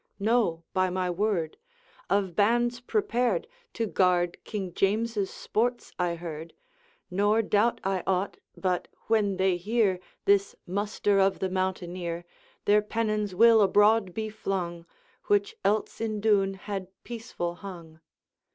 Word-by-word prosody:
'No, 210 Hz, -6 st, +1 dB
by 185 Hz, -1 st, +2 dB
my 180 Hz, 0 st, -1 dB
word; 175 Hz, -4 st, -1 dB, 0.5 s
of 195 Hz, -3 st, +1 dB
bands 240 Hz, +4 st, +2 dB
prepared 240 Hz, -, 0 dB, 0.3 s
To 230 Hz, -, -1 dB
guard 180 Hz, -3 st, +1 dB
King 190 Hz, -5 st, -5 dB
James's 210 Hz, +1 st, +1 dB
sports 240 Hz, +2 st, -2 dB
I 175 Hz, -1 st, +1 dB
heard; 165 Hz, -1 st, -7 dB, 0.6 s
Nor 205 Hz, +4 st, +3 dB
doubt 215 Hz, +3 st, +2 dB
I 190 Hz, -1 st, 0 dB
aught, 190 Hz, +1 st, 0 dB, 0.2 s
but, 180 Hz, -2 st, -1 dB, 0.2 s
when 205 Hz, -4 st, +2 dB
they 190 Hz, -1 st, +2 dB
hear 200 Hz, 0 st, +1 dB, 0.3 s
This 200 Hz, 0 st, +3 dB
muster 205 Hz, +1 st, 0 dB
of 195 Hz, 0 st, +3 dB
the 190 Hz, -, -2 dB
mountaineer, 180 Hz, -2 st, -3 dB, 0.4 s
Their 210 Hz, +1 st, +5 dB
pennons 215 Hz, -2 st, -1 dB
will 230 Hz, +2 st, +7 dB
abroad 205 Hz, 0 st, +4 dB
be 220 Hz, -1 st, -2 dB
flung, 175 Hz, -5 st, -3 dB, 0.4 s
Which 415 Hz, +1 st, +1 dB
else 215 Hz, +2 st, 0 dB
in 215 Hz, -2 st, -1 dB
Doune 200 Hz, -2 st, +2 dB
had 195 Hz, -1 st, -5 dB, 0.2 s
peaceful 225 Hz, -7 st, -4 dB
hung.' 170 Hz, -5 st, -9 dB
200 Hz, 130 wpm, -28 LUFS, 180-220 Hz, 0.6 s, will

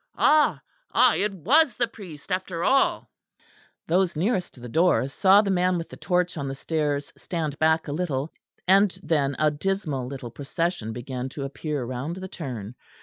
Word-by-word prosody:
Ah! 305 Hz, 0 st, +4 dB, 0.4 s
ah! -, -, +6 dB
it 210 Hz, +1 st, 0 dB
was 260 Hz, -, +3 dB
the 240 Hz, -, +1 dB
priest 190 Hz, -8 st, -11 dB
after 185 Hz, -2 st, -2 dB
all." 270 Hz, +5 st, +2 dB, 0.7 s
Those 180 Hz, +1 st, +1 dB
nearest 180 Hz, -, -1 dB
the 120 Hz, -, -8 dB
door 160 Hz, +1 st, +3 dB
saw 195 Hz, +8 st, +5 dB
the 200 Hz, -, 0 dB
man 180 Hz, -1 st, +2 dB
with 165 Hz, -, -5 dB
the -, -, -10 dB
torch 180 Hz, -1 st, 0 dB
on 140 Hz, -2 st, -3 dB
the 135 Hz, -, -4 dB
stairs 145 Hz, -1 st, -2 dB
stand 155 Hz, -5 st, -4 dB
back 160 Hz, +1 st, +2 dB
a -, -, -3 dB
little; 150 Hz, -3 st, -2 dB, 0.3 s
and 195 Hz, 0 st, +4 dB
then 140 Hz, -4 st, +1 dB
a 155 Hz, 0 st, +3 dB
dismal 150 Hz, -5 st, -2 dB
little 130 Hz, -3 st, -7 dB
procession 145 Hz, -1 st, -3 dB
began 125 Hz, +2 st, -5 dB
to 140 Hz, +2 st, -6 dB
appear 140 Hz, -1 st, -3 dB
round 130 Hz, +7 st, -4 dB
the 190 Hz, 0 st, -6 dB
turn. 125 Hz, -, -6 dB
160 Hz, 170 wpm, -25 LUFS, 140-185 Hz, 0.7 s, ah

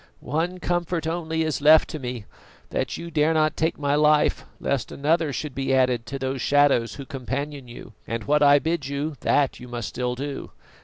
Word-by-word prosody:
One 175 Hz, +4 st, 0 dB
comfort 175 Hz, -2 st, -1 dB
only 160 Hz, -1 st, -1 dB
is 155 Hz, -2 st, -2 dB
left 155 Hz, +2 st, +7 dB
to 155 Hz, -, -5 dB
me, 125 Hz, -4 st, -5 dB, 0.5 s
that -, -, -2 dB
you 170 Hz, 0 st, -7 dB
dare 155 Hz, +1 st, +2 dB
not 155 Hz, 0 st, +2 dB
take 160 Hz, +1 st, 0 dB
my 145 Hz, -1 st, 0 dB
life 150 Hz, 0 st, +3 dB
lest 140 Hz, -4 st, -2 dB
another 155 Hz, +2 st, +1 dB
should 145 Hz, +1 st, -4 dB
be 135 Hz, 0 st, 0 dB
added 125 Hz, -3 st, +1 dB
to 135 Hz, -, -4 dB
those 130 Hz, -1 st, -3 dB
shadows 140 Hz, -6 st, +3 dB
who 140 Hz, -, -8 dB
companion 140 Hz, 0 st, -5 dB
you, 120 Hz, -1 st, -11 dB
and 115 Hz, -1 st, -3 dB
what 150 Hz, +1 st, +2 dB
I 145 Hz, 0 st, +7 dB
bid 160 Hz, -1 st, -1 dB
you, 145 Hz, +3 st, -3 dB
that 140 Hz, -2 st, +1 dB
you 125 Hz, -, -10 dB
must 120 Hz, -3 st, -4 dB
still 125 Hz, 0 st, -2 dB
do. 140 Hz, +2 st, -5 dB
145 Hz, 195 wpm, -24 LUFS, 130-155 Hz, 0.5 s, left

